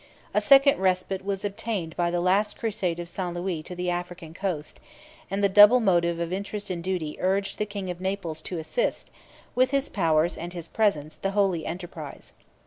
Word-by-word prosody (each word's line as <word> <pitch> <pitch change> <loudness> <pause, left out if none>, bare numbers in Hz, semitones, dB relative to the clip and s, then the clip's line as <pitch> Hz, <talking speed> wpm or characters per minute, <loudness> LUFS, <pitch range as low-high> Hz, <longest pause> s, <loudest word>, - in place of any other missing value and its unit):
A - - +3
second 275 -2 +6
respite 190 0 0
was 200 +1 -3
obtained 200 -5 -3
by 175 -1 +1
the 175 0 0
last 200 +4 +2
crusade 195 -6 -1
of 175 - -5
St. 175 0 -4
Louis 175 -2 -2
to 180 +3 -8
the 180 0 -1
African 175 -2 -5
coast; 170 -5 -4 0.5
and 195 +1 -2
the - - +6
double 205 +5 +8
motive 170 -5 +2
of 170 +1 -2
interest 200 +1 -4
and 170 -2 -4
duty 175 -5 -3
urged 195 +1 0
the 210 - 0
king 200 -3 -4
of 175 0 -8
Naples 185 -5 -3
to 180 - -3
assist, - - -2 0.4
with 255 +1 +3
his 275 0 0
powers 165 -3 +1
and 175 +2 -6
his 170 -2 -6
presence, 155 -9 0
the 195 0 -2
holy 185 -6 +1
enterprise. 170 -4 -8
185 Hz, 190 wpm, -26 LUFS, 170-200 Hz, 0.5 s, double